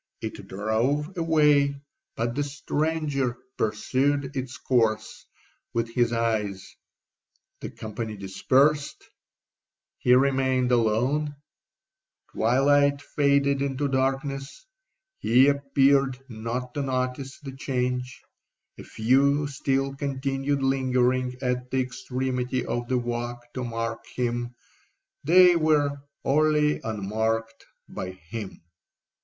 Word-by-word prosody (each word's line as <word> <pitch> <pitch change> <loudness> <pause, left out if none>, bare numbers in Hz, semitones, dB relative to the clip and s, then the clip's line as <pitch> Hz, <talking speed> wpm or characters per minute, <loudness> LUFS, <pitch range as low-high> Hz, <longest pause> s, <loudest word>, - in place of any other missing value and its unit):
It - - -7
drove 120 - -1
away, 150 -4 +3 0.4
but 115 +1 -1
the 145 - -1
stranger 145 -2 -1 0.2
pursued 135 +6 0
its 130 0 -4
course 110 -5 0 0.5
with 115 0 0
his 120 -1 +2
eyes—the 110 -5 -5
company 110 0 -6
dispersed, 135 +10 +1 0.9
he 125 - +5
remained 130 -1 +2
alone—twilight 140 +2 0 0.2
faded 140 -1 +3
into 140 +1 -1
darkness—he 135 - -1
appeared 140 -1 +3
not 120 +2 -5
to 145 - -2
notice 130 0 -3
the 140 -2 -8
change—a 125 -2 -5
few 140 +6 +2
still 135 -1 -1
continued 135 0 -2
lingering 130 -1 +1
at 125 0 -1
the 130 - 0
extremity 125 0 -2
of 120 0 -3
the 130 - +1
walk 120 0 -4
to 130 - -4
mark 115 -1 -3
him—they 125 +8 +1
were 145 -3 +2 0.2
wholly 150 +1 +2
unmarked 110 +1 -2 0.2
by 90 - -5
him. 95 +2 -8
130 Hz, 90 wpm, -26 LUFS, 120-140 Hz, 0.9 s, he